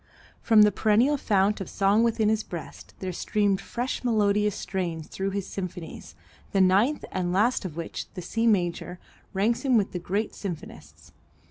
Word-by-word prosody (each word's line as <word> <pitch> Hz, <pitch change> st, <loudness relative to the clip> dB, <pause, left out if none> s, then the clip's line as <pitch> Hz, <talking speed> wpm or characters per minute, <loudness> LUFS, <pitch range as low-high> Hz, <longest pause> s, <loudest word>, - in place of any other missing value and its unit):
From 220 Hz, -2 st, +6 dB
the 210 Hz, -, +5 dB
perennial 220 Hz, +8 st, +3 dB
fount 205 Hz, -5 st, +1 dB
of 195 Hz, -, -5 dB
song 200 Hz, +3 st, +3 dB
within 225 Hz, -2 st, +2 dB
his 220 Hz, 0 st, +2 dB
breast 170 Hz, -6 st, -9 dB
there 185 Hz, -1 st, -3 dB
streamed 200 Hz, +1 st, 0 dB
fresh 245 Hz, +2 st, -4 dB
melodious 210 Hz, -3 st, +2 dB
strains 175 Hz, -4 st, -3 dB
through 195 Hz, +1 st, -3 dB
his 195 Hz, -1 st, -3 dB
symphonies, 180 Hz, -3 st, -7 dB, 0.4 s
the 195 Hz, -, +2 dB
ninth 200 Hz, +10 st, +3 dB
and 180 Hz, -1 st, -1 dB
last 215 Hz, +4 st, +2 dB
of 165 Hz, -3 st, -6 dB
which, 170 Hz, -, -6 dB
the 180 Hz, -, -5 dB
C 225 Hz, +6 st, 0 dB
major, 180 Hz, -3 st, 0 dB, 0.3 s
ranks 215 Hz, +4 st, +1 dB
him 260 Hz, -4 st, +3 dB
with 205 Hz, -, +1 dB
the 180 Hz, -, -4 dB
great 200 Hz, +5 st, -2 dB
symphonists. 80 Hz, -, -8 dB
200 Hz, 165 wpm, -26 LUFS, 180-220 Hz, 0.4 s, From